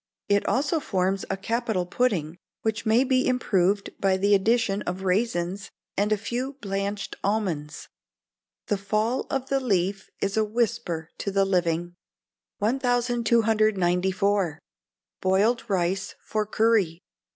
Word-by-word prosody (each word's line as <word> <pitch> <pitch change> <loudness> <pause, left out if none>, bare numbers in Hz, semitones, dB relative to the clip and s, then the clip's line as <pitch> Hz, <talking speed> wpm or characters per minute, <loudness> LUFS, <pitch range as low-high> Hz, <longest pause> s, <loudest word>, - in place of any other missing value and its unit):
It 200 0 +3
also 290 +5 +1
forms 190 -6 -1
a 195 - -1
capital 220 -2 -1
pudding, 180 -6 0 0.2
which 220 0 -1
may 225 +4 +5
be 260 -1 +2
improved 200 -5 +1
by 190 -1 +2
the 200 +2 +3
addition 210 0 +2
of 185 +2 -4
raisins, 195 -1 0 0.3
and 205 +2 +1
a 215 - +3
few 245 +6 -3
blanched 200 -4 -4
almonds. 185 -8 -2 0.8
[THE 205 - -1
FALL 215 +5 0
OF 270 -1 -2
THE 275 - +2
LEAF 195 -5 0
IS 200 +2 -1
A 220 - +4
WHISPER 215 -7 -1
TO - - -2
THE 195 0 +2
LIVING.] 175 -2 0 0.6
1294. 215 - +2 0.6
Boiled 205 +6 +2
Rice 190 0 -1
for 215 -1 -2
Curry. 210 -6 +2
200 Hz, 125 wpm, -26 LUFS, 190-230 Hz, 0.8 s, may